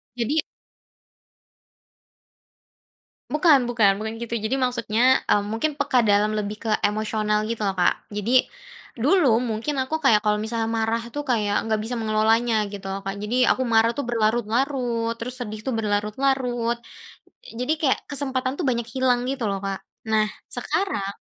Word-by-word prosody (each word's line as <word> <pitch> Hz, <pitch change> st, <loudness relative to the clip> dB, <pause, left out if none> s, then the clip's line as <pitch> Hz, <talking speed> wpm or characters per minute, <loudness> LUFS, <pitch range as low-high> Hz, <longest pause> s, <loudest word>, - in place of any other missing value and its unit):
Jadi 260 Hz, +6 st, 0 dB, 2.9 s
Bukan 300 Hz, -5 st, +4 dB
bukan, 225 Hz, -4 st, +4 dB
bukan 220 Hz, 0 st, -3 dB
gitu 235 Hz, 0 st, -4 dB
jadi 225 Hz, +3 st, -1 dB
maksudnya, 250 Hz, 0 st, +2 dB
eee, 205 Hz, -, +4 dB
mungkin 280 Hz, +8 st, -2 dB
peka 260 Hz, -3 st, +2 dB
dalam 210 Hz, 0 st, +3 dB
lebih 210 Hz, 0 st, -3 dB
ke -, -, 0 dB
emosional 215 Hz, 0 st, 0 dB
gitu 230 Hz, -1 st, -3 dB
loh 195 Hz, -2 st, 0 dB
Kak 175 Hz, -, +4 dB, 0.2 s
jadi, 215 Hz, +5 st, +2 dB, 0.5 s
dulu 270 Hz, -, +4 dB
mungkin 235 Hz, +4 st, -2 dB
aku 265 Hz, +4 st, -1 dB
kayak 220 Hz, -5 st, +5 dB
kalau 210 Hz, 0 st, +3 dB
misalnya 225 Hz, 0 st, -2 dB
marah 225 Hz, 0 st, 0 dB
tuh 290 Hz, -, -2 dB
kayak 210 Hz, -4 st, +1 dB
nggak 220 Hz, -1 st, 0 dB
bisa 225 Hz, +3 st, -3 dB
mengelolanya 220 Hz, 0 st, +2 dB
gitu 200 Hz, -1 st, -7 dB
loh 195 Hz, +1 st, -3 dB
Kak 195 Hz, +1 st, -3 dB
jadi 215 Hz, +4 st, -2 dB, 0.2 s
aku 260 Hz, -, -2 dB
marah 230 Hz, -1 st, +3 dB
tuh 285 Hz, -, -2 dB
berlarut-larut 235 Hz, +1 st, 0 dB
terus 245 Hz, +2 st, -5 dB
sedih 215 Hz, -3 st, -5 dB
tuh 265 Hz, -, 0 dB
berlarut-larut, 235 Hz, +3 st, 0 dB, 0.8 s
jadi 250 Hz, +5 st, 0 dB
kayak 275 Hz, -4 st, +2 dB
kesempatan 265 Hz, -2 st, -1 dB
tuh 340 Hz, -, -1 dB
banyak 235 Hz, -2 st, -2 dB
hilang 255 Hz, -2 st, +2 dB
gitu 270 Hz, -3 st, -3 dB
loh 195 Hz, -, -2 dB
Kak, 195 Hz, -1 st, -3 dB, 0.3 s
nah 215 Hz, -1 st, +3 dB, 0.3 s
sekarang 200 Hz, -, -2 dB
230 Hz, 150 wpm, -24 LUFS, 215-255 Hz, 2.9 s, kayak